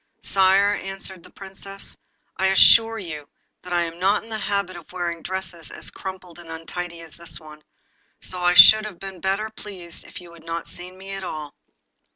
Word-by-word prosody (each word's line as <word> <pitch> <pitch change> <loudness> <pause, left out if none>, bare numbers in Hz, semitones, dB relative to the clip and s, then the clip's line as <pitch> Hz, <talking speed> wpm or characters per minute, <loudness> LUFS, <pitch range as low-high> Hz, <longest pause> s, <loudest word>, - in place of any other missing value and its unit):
'Sire,' 195 +1 +4
answered 195 -1 -6
the - - -16
Princess, 195 0 -9 0.4
'I 190 - +2
assure 225 +4 +7
you 155 -7 -7 0.3
that 180 - -10
I 175 -1 +2
am 170 0 -6
not 195 +3 +2
in 225 - -14
the 220 - -3
habit 200 -3 -1
of 170 -2 -11
wearing 175 -2 -3
dresses 175 -2 -5
as - - -5
crumpled 185 -3 -8
and 170 -1 -12
untidy 170 +1 -6
as 165 -1 -12
this 170 0 -3
one, 155 -1 -13 0.6
so 185 - -5
I 175 0 +3
should 215 +3 +10
have 205 -5 -7
been 190 -2 -8
better 195 +3 -1
pleased 185 -6 -8
if - - -10
you 175 -1 -13
had 165 -1 -15
not 165 +1 -4
seen 180 +1 -7
me 195 +1 -9
at 195 0 -5
all. 155 -4 -6
185 Hz, 190 wpm, -23 LUFS, 170-195 Hz, 0.6 s, should